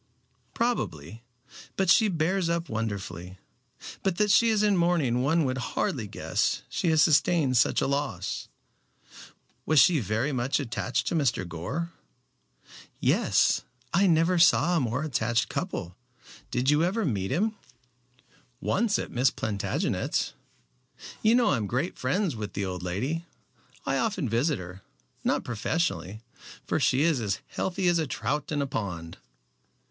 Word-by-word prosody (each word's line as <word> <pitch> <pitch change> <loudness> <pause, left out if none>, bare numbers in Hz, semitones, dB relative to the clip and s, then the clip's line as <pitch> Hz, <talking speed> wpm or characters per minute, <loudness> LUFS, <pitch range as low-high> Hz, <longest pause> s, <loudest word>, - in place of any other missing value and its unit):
"Probably, 115 - -2 0.6
but 190 - +1
she 220 - +5
bears 175 0 0
up 170 0 -1
wonderfully. 100 -5 -4 0.6
But 190 -3 -1
that 210 -1 +3
she 230 +4 +5
is 215 -2 +2
in 205 -1 +3
mourning 170 -9 +2
one 160 +5 +2
would 130 0 -1
hardly 125 -2 -2
guess - - -1
she 175 - -1
had 160 -1 +3
sustained 155 -3 +3
such 120 - +3
a - - +1
loss. 140 -10 -2 1.2
Was 155 -2 +4
she 165 0 +5
very 110 +6 -1
much 130 +2 0
attached 125 -1 -2
to - - -1
Mr. 125 - 0
Gore?" 135 - -4 1.1
"Yes. - - +3 0.3
I 195 +3 +4
never 170 +1 +3
saw 170 0 +5
a - - +3
more 125 +2 -1
attached 115 -5 0
couple. 95 - -4 0.5
Did 125 +3 +1
you 150 +2 +3
ever 200 +5 0
meet 100 - -1
him?" 210 +10 +1 1.1
"Once 215 0 +1
at - - -5
Miss 125 +2 +3
Plantagenet's. 100 -3 -2 0.9
You 220 +2 +4
know 245 -1 +4
I 145 - +2
am 105 -3 -2
great 130 - -2
friends 175 - -1
with 105 -2 -6
the 100 - -2
old 90 -2 -4
lady. 130 - -3 0.6
I 135 - 0
often 195 - -1
visit 125 +7 +1
her, 90 +1 -9 0.4
not - - +1
professionally, 115 - -2 0.4
for - - 0
she 130 +3 +3
is 160 -6 +2
as 100 -3 -1
healthy 190 0 -2
as 175 -1 +3
a 160 - -1
trout 150 +3 -3
in 145 -2 0
a - - -1
pond." 90 -10 -5
140 Hz, 150 wpm, -27 LUFS, 110-170 Hz, 1.2 s, she